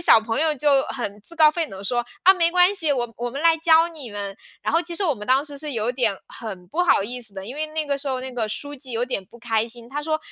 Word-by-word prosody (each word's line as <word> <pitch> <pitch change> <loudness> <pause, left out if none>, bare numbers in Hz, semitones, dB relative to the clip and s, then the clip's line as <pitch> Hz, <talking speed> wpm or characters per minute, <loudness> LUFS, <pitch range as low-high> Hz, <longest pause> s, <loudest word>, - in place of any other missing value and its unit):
小 340 - +8
朋 225 +5 -2
友 315 -1 +3
就 280 -1 +3
很 210 -5 -5
自 335 +10 -10
告 310 -1 +7
奋 325 0 -2
勇 190 - -9
地 200 - -9
说： 240 +3 0 0.2
“啊， 380 - +9
没 340 -3 +2
关 360 +3 +4
系， 325 -6 +2
我 245 -4 +1
我 245 0 -2
们 275 - -6
来 330 -1 +6
教 325 0 +5
你 300 -7 -9
们。” 200 -1 -5 0.3
然 - - 0
后 330 - +4
其 340 0 -5
实 400 - -1
我 305 -6 +2
们 210 -2 -9
当 265 +3 +3
时 285 -2 -3
是 300 -1 -3
有 230 +1 0
点 230 -6 +1
很 195 -6 -8
不 340 - -2
好 325 - +4
意 245 +4 -4
思 215 -4 -1
的， 190 0 -6
因 245 +6 -7
为 310 +1 -2
那 310 0 -3
个 280 -1 -1
时 280 0 -4
候 260 -1 -1
那 260 -1 -6
个 225 -3 -2
书 290 +6 -4
记 255 -2 -9
有 230 +2 0
点 250 -6 -3
不 235 - -16
开 225 -1 0
心， 235 0 -6
他 290 - -3
说， 310 +1 -1
270 Hz, 325 characters per minute, -23 LUFS, 225-310 Hz, 0.3 s, 啊